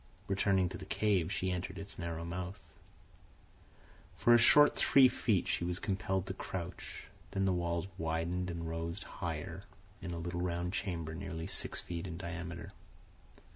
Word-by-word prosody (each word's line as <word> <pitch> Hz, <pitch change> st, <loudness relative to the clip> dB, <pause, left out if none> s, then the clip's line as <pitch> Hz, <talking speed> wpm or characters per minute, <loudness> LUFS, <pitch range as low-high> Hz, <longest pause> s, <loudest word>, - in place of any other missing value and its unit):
Returning 95 Hz, -1 st, +3 dB
to -, -, -7 dB
the -, -, -7 dB
cave, 100 Hz, -5 st, +1 dB
she 95 Hz, -1 st, 0 dB
entered 90 Hz, +1 st, -3 dB
its 100 Hz, -, -7 dB
narrow 85 Hz, -1 st, -3 dB
mouth. 90 Hz, +2 st, -4 dB, 1.6 s
For 120 Hz, -, +6 dB
a -, -, +9 dB
short 145 Hz, +6 st, +7 dB
three 135 Hz, -2 st, +7 dB
feet 105 Hz, -6 st, +1 dB
she -, -, +1 dB
was 90 Hz, 0 st, -1 dB
compelled 95 Hz, -1 st, -1 dB
to 95 Hz, -, -3 dB
crouch, 90 Hz, -2 st, -6 dB, 0.3 s
then 95 Hz, 0 st, 0 dB
the 95 Hz, -, +3 dB
walls 85 Hz, 0 st, 0 dB
widened 85 Hz, +3 st, -1 dB
and 85 Hz, -1 st, -4 dB
rose 85 Hz, +3 st, -3 dB
higher 80 Hz, -5 st, -4 dB, 0.4 s
in 90 Hz, -, -4 dB
a 85 Hz, -, -3 dB
little 85 Hz, +1 st, -3 dB
round 90 Hz, 0 st, -1 dB
chamber 85 Hz, -6 st, -2 dB
nearly 80 Hz, -2 st, -4 dB
six 95 Hz, -, -1 dB
feet 85 Hz, +1 st, -4 dB
in 85 Hz, -2 st, -5 dB
diameter. 85 Hz, -2 st, -5 dB
90 Hz, 160 wpm, -34 LUFS, 85-95 Hz, 1.6 s, a